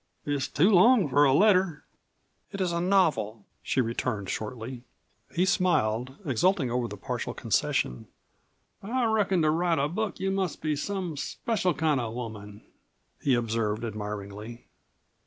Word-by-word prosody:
It's 145 -2 -1
too 180 +10 +3
long 215 0 +6
for 145 +3 +5
a 135 - +4
letter." 185 -1 +3 0.7
"It 200 - -6
is 185 -2 0
a 170 0 -1
novel," 155 - +1 0.2
she 130 - +1
returned 110 -4 -2
shortly. 120 +3 -5 0.5
He 180 +2 +3
smiled, 135 - +1
exulting 145 - +1
over 125 -1 0
this - - -9
partial - - -4
concession. 60 - -1 0.7
"I 240 +5 -1
reckon 200 -6 +2
to 155 - +4
write 170 +1 +1
a 140 +1 +1
book 205 +7 -3
you 190 0 0
must 190 -3 -1
be 155 -1 -1
some 180 0 -3
special 185 +2 -1
kind 150 -1 +1
of 120 - -2
a 110 - -7
woman," 105 -4 -7 0.6
he 135 -3 +3
observed 115 -2 -1
admiringly. 105 +1 -6
145 Hz, 150 wpm, -27 LUFS, 115-185 Hz, 0.7 s, long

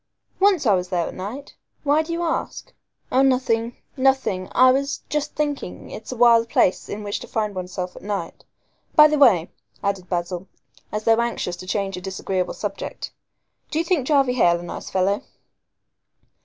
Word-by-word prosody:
"Once 385 -6 +4
I 210 - +5
was 180 -1 0
there 175 -2 0
at - - -6
night. 225 +10 -7 0.3
Why 295 +1 +3
do 320 +1 -6
you 340 +1 -1
ask?" 330 - -3 0.4
"Oh, 260 - +4
nothing 245 -3 +1 0.2
nothing. 265 -9 +1
I 255 0 +6
was 275 +2 -1
just 300 0 -2
thinking 290 -10 -3
it's 220 - -8
a - - -4
wild 230 -1 +5
place 185 - +2
in 210 +1 -5
which 205 0 -3
to - - -9
find 210 -2 -2
one's 185 -1 -6
self 180 -1 -4
at - - -11
night. 200 -5 -4 0.5
By 300 -1 +9
the 300 -1 0
way," 195 - +5 0.3
added 195 -3 -2
Basil, 175 +1 -3 0.4
as 210 0 -3
though 225 +1 +4
anxious 235 -6 -2
to 185 - -10
change 195 -1 -2
a - - -6
disagreeable 190 -1 -2
subject, 205 -2 -5 0.6
"do 310 - -3
you 330 - +1
think 330 -7 +1
Jarvey 275 -4 +3
Hale 175 -8 +3
a - - -8
nice 175 - -7
fellow?" 190 +2 +1
225 Hz, 180 wpm, -23 LUFS, 185-275 Hz, 0.6 s, By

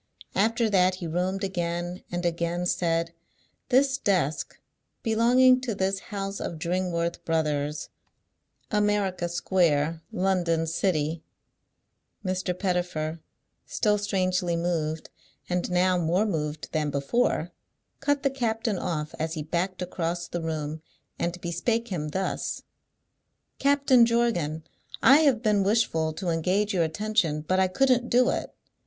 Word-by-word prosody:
After 225 +3 +2
that 185 -3 +3
he 185 -2 -7
roamed 180 +4 -1
again, 175 -1 -3
and 175 0 -2
again 170 +1 -1
said, 170 -1 0 0.6
"This 265 +1 +3
desk, 180 - 0 0.4
belonging 250 +3 +5
to 240 -4 -3
this 195 0 0
house 195 -1 -4
of 165 - -4
Dringworth 170 0 -1
Brothers, 150 -2 -1 0.8
America 205 -4 +1
Square, 165 -3 +1
London 180 -3 +1
City 160 -2 0 0.5
" - - -33
Mr. 185 -1 -1
Pettifer, 175 -4 -1 0.5
still 210 -2 +1
strangely 185 -3 0
moved, 165 -2 -2 0.4
and 180 0 -1
now 180 0 +2
more 175 +5 +2
moved 155 -6 -3
than 155 -2 0
before, 155 - 0 0.5
cut 285 0 0
the 275 - +2
captain 225 -5 -1
off 155 -3 -3
as 160 +1 -2
he 155 - -3
backed 180 +4 -2
across 175 -1 -3
the 175 +1 -4
room, 155 -1 -3 0.4
and 175 +1 -2
bespake 225 +8 -1
him 160 -6 -3
thus: 190 +5 -3 1.0
"Captain 275 -4 +5
Jorgan, 175 -10 0 0.4
I 275 - +8
have 270 -7 +3
been 210 -3 +3
wishful 195 -6 +1
to 180 +3 -3
engage 185 +6 +1
your 170 -3 +2
attention, 170 -2 0
but 185 +5 0
I 190 - +4
couldn't 250 +4 +2
do 250 +1 +4
it. - - -3
180 Hz, 130 wpm, -26 LUFS, 165-210 Hz, 1.0 s, I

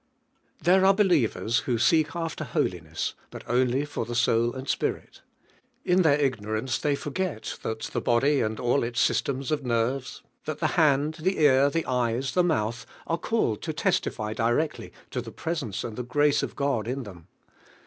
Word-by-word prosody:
There 185 +2 +4
are 195 0 +6
believers 160 - +2
who 120 -3 -1
seek 155 +6 +3
after 165 -2 -3
hol 130 - 0
iness, 80 -3 -4 0.2
but - - -9
only 125 +3 +1
for 145 - -4
the 120 - -5
soul 120 0 +2
and 130 +1 -7
spirit. - - -2 0.6
In 180 +1 +4
their 150 -4 +4
ignorance 120 -2 -1
they 145 -2 +1
forget 145 -5 -4
that 110 0 -4
the - - -3
body 135 +4 +2
and 110 -1 -2
all 120 +3 +2
its 115 0 -2
systems 135 +1 0
of 150 -2 0
nerves; 125 +2 -1 0.2
that 155 -1 -3
the 155 - 0
hand, 150 -1 +3
the 190 +3 +1
ear, 140 -2 +5
the 165 +3 -1
eyes, 125 +1 0
the 180 - +3
mouth 115 -8 -1 0.2
are 165 0 -1
called 170 - 0
to - - -3
testify 110 0 -1
directly 120 +7 -1 0.2
to 125 - -2
the 115 - -8
presence 145 - -3
and 110 - -5
the 125 - -3
grace 145 +4 +2
of - - -4
God 140 -6 -1
in 130 +2 -3
them. 90 -6 -12
130 Hz, 180 wpm, -26 LUFS, 115-155 Hz, 0.6 s, are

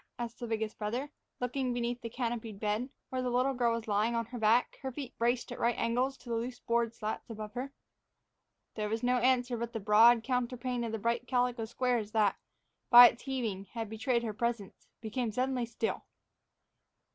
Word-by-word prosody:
asked 240 -1 -5
the 240 - -4
biggest 220 -1 -3
brother, 240 +7 -3 0.3
looking 250 0 -1
beneath 240 0 -2
the 230 - -5
canopied 230 -3 -4
bed, 215 +5 -1 0.2
where 255 0 -2
the 250 - -1
little 255 +3 +2
girl 240 -2 +2
was 230 0 -5
lying 215 +3 +1
on 230 0 0
her 240 +2 -7
back, 225 +3 +2
her 265 -1 -3
feet 265 -1 -7
braced 240 +1 +1
at 245 - -6
right 235 0 +1
angles 255 +4 0
to - - -18
the 235 - -2
loose 240 +2 -3
board 235 -1 0
slats 215 +1 -4
above 215 -2 -7
her. 255 +3 -4 1.0
There 210 -1 -3
was 225 +3 -2
no 250 +1 +3
answer, 250 0 +2
but 235 +1 -4
the 225 - -2
broad 225 +3 +6
counterpane 250 0 -1
of 225 -1 -3
bright 235 +1 0
calico 245 -2 +1
squares 235 -2 -1
that, 210 -3 +3 0.5
by 240 0 +11
its 235 - -10
heaving, 230 -8 -3
had 225 -2 -4
betrayed 235 +2 0
her 220 -2 -3
presence, 230 -2 -3
became 225 +1 -2
suddenly 250 +1 -1
still. 230 -1 -2
235 Hz, 190 wpm, -31 LUFS, 225-250 Hz, 1.0 s, by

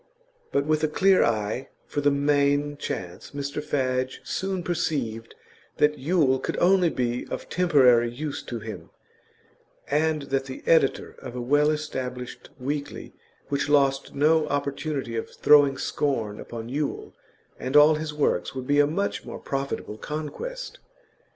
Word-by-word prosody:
But 140 - +1
with 155 0 +1
a - - +4
clear 190 +5 +4
eye 110 +3 -1 0.2
for 145 - -3
the 145 - +4
main 145 0 +2
chance 90 -8 -6
Mr 140 +1 -3
Fadge 130 -3 -1
soon 190 -2 -3
perceived 120 -10 -2 0.4
that 150 0 +2
Yule 140 -3 +2
could - - -3
only 180 -1 +4
be 125 -4 -2
of - - -6
temporary 130 -9 +4
use 145 +4 -5
to 120 - -6
him, 110 0 -8 1.0
and 155 0 +1
that 135 -1 -1
the 130 -1 -8
editor 160 -5 +3
of 125 -2 -8
a - - -3
well 145 +4 +3
established 130 -5 -4
weekly 140 +2 -4 0.4
which 140 0 -1
lost 140 -2 +2
no 155 +2 +3
opportunity 140 -3 -2
of 115 - -3
throwing 145 -2 +5
scorn 115 -8 -1
upon 115 -1 -7
Yule 145 +3 -3 0.5
and 130 +3 +1
all 150 +1 +8
his 155 0 -3
works 145 -9 0
would 130 -1 -4
be 145 +2 +2
a 145 - +5
much 195 +7 -2
more - - -7
profitable 135 -5 -4
conquest. - - -6
145 Hz, 145 wpm, -25 LUFS, 130-150 Hz, 1.0 s, all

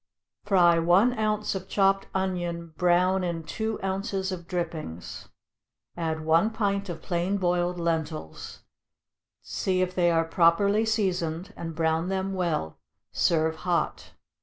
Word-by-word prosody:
= - - -48
Fry 175 -4 +5
one 190 +9 +4
ounce 215 -1 0
of 190 -1 -5
chopped 195 -1 +2
onion 175 -3 -2
brown 180 +1 +3
in 170 -2 -3
two 220 +6 -3
ounces 195 0 -2
of 175 -2 -6
drippings, 160 - -5 0.7
add 160 -2 -3
one 165 +7 +4
pint 200 -3 -1
of 165 -2 -6
plain 180 +3 0
boiled 180 -1 0
lentils, 160 - -4 0.8
see 185 -1 0
if 185 0 -3
they 175 -2 +3
are 165 -1 +2
properly 200 +6 +3
seasoned, 185 -5 -1
and 165 -1 -6
brown 160 +2 0
them 195 0 -2
well; 170 - -2 0.3
serve 160 -1 +1
hot. 175 0 -2
175 Hz, 135 wpm, -27 LUFS, 165-195 Hz, 0.8 s, Fry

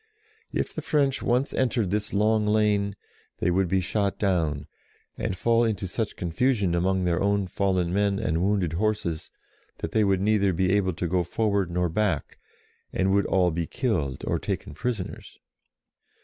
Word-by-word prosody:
If - - -2
the 155 - -4
French 145 -4 +1
once 125 +4 +1
entered 120 -7 0
this 105 0 -1
long 105 +1 +2
lane, 105 -2 +2 0.4
they 90 - +1
would 95 +1 +2
be 95 +2 +1
shot 100 +2 -1
down, 80 -7 0 0.5
and 95 - -3
fall 115 +4 +3
into 105 -4 -1
such 110 +3 -3
confusion 100 +2 +1
among 95 +2 +1
their 85 -1 +1
own 100 0 +2
fallen 95 -2 0
men 100 0 +2
and 85 -3 0
wounded 95 -4 +1
horses, 100 -4 -1 0.5
that - - -5
they 110 - +3
would 100 -2 +2
neither 100 -1 +2
be 90 +2 +1
able 95 -3 +2
to 85 +2 -3
go 90 +2 +1
forward 100 0 0
nor 90 0 0
back, 90 -2 -1 0.5
and 95 +1 +1
would 100 0 +2
all 90 -2 +3
be 85 0 -2
killed 90 - -1
or - - 0
taken - - -4
prisoners. 115 -7 -4
100 Hz, 165 wpm, -26 LUFS, 90-105 Hz, 0.5 s, fall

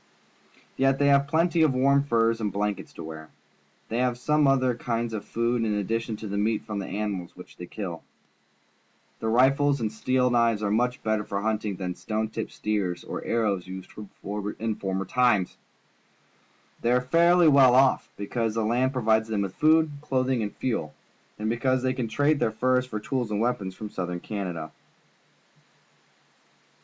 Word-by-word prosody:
Yet 135 0 +3
they 140 0 +3
have 140 0 +4
plenty 165 +3 +2
of 150 -5 +3
warm 140 +2 +3
furs 115 -3 +1
and 105 -2 -1
blankets 105 0 -3
to - - -8
wear. 80 -1 -9 0.6
They 115 - -1
have 125 -1 +1
some 150 +3 +2
other 130 -2 +3
kinds 115 -1 -3
of 110 - -4
food 115 0 0
in 105 -2 0
addition 115 +3 -2
to 110 - -7
the 100 0 -2
meat 110 +1 0
from 105 -1 -4
the 95 - -5
animals 100 -3 -4
which 90 - -13
they 90 - -9
kill. 90 -6 -6 1.2
Their 110 - -2
rifles 135 +4 +3
and 110 -2 -2
steel 125 +3 +1
knives 115 -3 +2
are 100 - 0
much 125 +4 0
better 110 -1 0
for 100 -1 -3
hunting 110 -2 -1
than 90 0 -4
the - - -9
stone 110 0 -2
tipped 110 0 -5
spears 100 -5 -2
and - - -5
arrows 105 -6 0
used 95 0 -8
in 105 +1 -5
former 95 -1 -3
times. 120 -4 +2 1.3
They 120 - +1
are 125 - +3
fairly 170 +6 +4
well 135 -4 +6
off, 130 0 +3
because 110 +2 -2
the 115 - 0
land 125 +4 +1
provides 110 -3 +2
them 105 -2 -1
with 95 -2 -4
food, 155 +3 +3
clothing, 130 -3 0
and 105 -1 -4
fuel, 115 -12 -3 0.4
and 105 - -3
because 130 +3 +1
they 130 0 +1
can 125 -3 -3
trade 145 +6 +1
their - - +2
furs 125 +3 +1
for 110 -4 -4
tools 125 +1 -2
and 105 -1 -1
weapons 105 -5 -1
from 105 0 -7
Soutliern 90 -1 -4
Canada. 90 -7 -5
115 Hz, 175 wpm, -26 LUFS, 105-130 Hz, 1.3 s, well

